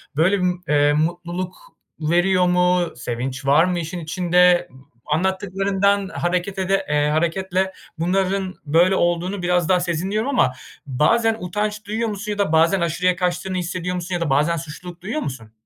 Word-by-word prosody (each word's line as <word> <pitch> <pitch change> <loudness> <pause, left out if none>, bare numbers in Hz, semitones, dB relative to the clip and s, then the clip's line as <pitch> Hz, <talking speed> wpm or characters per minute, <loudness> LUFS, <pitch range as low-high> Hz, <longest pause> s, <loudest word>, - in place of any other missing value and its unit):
Böyle 185 +6 +3
bir, 180 - +2 0.2
eee, 145 0 +4
mutluluk 175 +3 -2 0.4
veriyor 175 +3 +2
mu? 180 0 +2
Sevinç 125 +2 -4
var 150 +5 +5
mı 180 -1 -1
işin 170 +2 -5
içinde? 175 +2 +3 0.4
A 150 - 0
anlattıklarından 195 +2 0
hareket 180 +2 -2
ede 195 +1 0
eee, 150 0 +2
hareketle 185 +4 0 0.3
bunların 190 +2 0
böyle 175 +6 +4
olduğunu 175 +3 0
biraz 175 -2 +1
daha 185 -1 +4
sezinliyorum 190 - -1
ama 130 - +2 0.3
bazen 225 - +2
utanç 210 +3 -3
duyuyor 220 +2 -2
musun 210 +1 -4
ya 205 - -3
da 200 -6 0
bazen 165 +3 +3
aşırıya 175 +2 +1
kaçtığını 180 +1 -2
hissediyor 180 0 -3
musun 180 0 -3
ya 170 - -3
da 155 - -1
bazen 150 +5 +2
suçluluk 170 +3 -9
duyuyor 230 +11 -3
musun? 115 -5 -6
180 Hz, 155 wpm, -21 LUFS, 165-190 Hz, 0.4 s, var